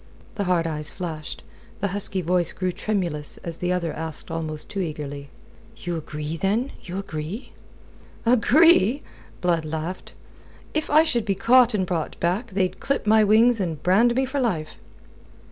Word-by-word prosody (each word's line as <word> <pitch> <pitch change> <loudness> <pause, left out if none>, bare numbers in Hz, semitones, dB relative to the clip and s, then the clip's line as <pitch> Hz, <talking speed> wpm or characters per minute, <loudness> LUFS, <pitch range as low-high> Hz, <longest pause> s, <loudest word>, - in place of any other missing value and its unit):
The 200 - -2
hard 175 -2 +2
eyes 150 -2 0
flashed, 160 -5 -6 0.4
the 200 - -1
husky 195 -1 -1
voice 175 0 +2
grew 185 -1 -1
tremulous 175 -6 -2
as 165 -1 -5
the 180 0 -1
other 170 -3 -1
asked 160 +1 -3
almost 155 -2 -4
too 200 - -5
eagerly: 145 -5 -5 0.5
"You 175 -1 -4
agree, 150 0 -5
then? 215 - 0
You 180 +1 -6
agree?" 195 - -5 0.7
"Agree?" 255 - +5 0.4
Blood 175 -3 +1
laughed. 160 +4 -5 0.6
"If 310 0 -1
I 310 +2 +6
should 240 -8 0
be 200 -2 0
caught 235 +3 +5
and 190 -3 +1
brought 170 -3 -3
back, 185 +8 0
they'd 185 -1 -1
clip 275 -4 -1
my 215 0 +5
wings 225 +3 +5
and 165 -6 -3
brand 225 +7 +4
me 265 +1 +2
for 270 +2 -3
life." 180 -12 -2
185 Hz, 160 wpm, -24 LUFS, 160-220 Hz, 0.7 s, I